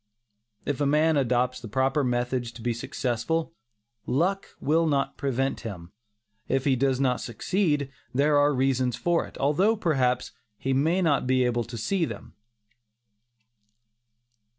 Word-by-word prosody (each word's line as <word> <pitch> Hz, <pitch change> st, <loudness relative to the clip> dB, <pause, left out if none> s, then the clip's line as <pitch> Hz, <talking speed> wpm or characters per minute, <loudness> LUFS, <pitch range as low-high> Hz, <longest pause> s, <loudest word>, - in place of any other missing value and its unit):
If 145 Hz, 0 st, -2 dB
a 145 Hz, -, +2 dB
man 155 Hz, +2 st, +3 dB
adopts 125 Hz, -1 st, +1 dB
the 120 Hz, -, -8 dB
proper 135 Hz, +5 st, +1 dB
methods 125 Hz, -1 st, -1 dB
to 115 Hz, -, -11 dB
be 120 Hz, -1 st, 0 dB
successful, 125 Hz, +7 st, -2 dB, 0.5 s
"luck" 185 Hz, +8 st, 0 dB
will 160 Hz, +3 st, +2 dB
not 140 Hz, -2 st, 0 dB
prevent 135 Hz, -1 st, -1 dB
him. 90 Hz, -7 st, -8 dB, 0.6 s
If 135 Hz, 0 st, 0 dB
he 135 Hz, -2 st, +3 dB
does 130 Hz, 0 st, +1 dB
not 130 Hz, -2 st, +1 dB
succeed, 145 Hz, -, -1 dB, 0.2 s
there 145 Hz, +3 st, +2 dB
are 145 Hz, +1 st, +4 dB
reasons 130 Hz, -2 st, +1 dB
for 175 Hz, -1 st, 0 dB
it, -, -, -13 dB
although 180 Hz, +11 st, +2 dB
perhaps, 130 Hz, -, 0 dB, 0.3 s
he 135 Hz, +4 st, -1 dB
may 160 Hz, +8 st, +2 dB
not 145 Hz, -6 st, +2 dB
be 130 Hz, 0 st, +3 dB
able 120 Hz, -1 st, 0 dB
to 115 Hz, 0 st, -8 dB
see 175 Hz, -, 0 dB
them. -, -, -8 dB
135 Hz, 145 wpm, -26 LUFS, 125-150 Hz, 0.6 s, are